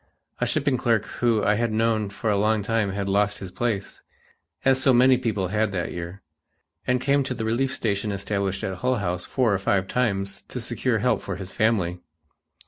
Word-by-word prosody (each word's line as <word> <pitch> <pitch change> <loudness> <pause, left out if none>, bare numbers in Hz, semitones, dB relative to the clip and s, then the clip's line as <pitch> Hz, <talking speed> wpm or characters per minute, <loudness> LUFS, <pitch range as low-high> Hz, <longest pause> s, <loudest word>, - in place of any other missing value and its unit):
A - - +1
shipping 135 -3 +1
clerk 115 -4 +1 0.2
whom 115 -3 +3
I 105 - +4
had 115 +1 0
known 110 -1 +1
for 105 +2 -2
a - - +2
long 105 +1 +2
time 110 -1 0
had 100 0 -3
lost 105 +1 +1
his 95 -2 -8
place, 110 -2 -3 0.6
as 135 0 +4
so 130 -1 +5
many 130 +2 +6
people 110 -7 -1
had 105 +1 +1
that 85 -3 -2
year, 85 +3 -7 0.6
and 125 0 +2
came 140 +2 +2
to 130 -1 -3
the 110 - -3
relief 125 +4 +1
station 105 -4 -1
established 100 -1 -2
at 95 -1 -3
Hull 125 +6 +1
House 90 -5 -2
four 125 -6 +1
or 95 - +1
five 95 -1 +1
times 100 -6 -1
to - - -5
secure - - 0
help - - +1
for 100 - -4
his 95 -1 -7
family. 95 -6 +1
105 Hz, 200 wpm, -25 LUFS, 100-120 Hz, 0.6 s, many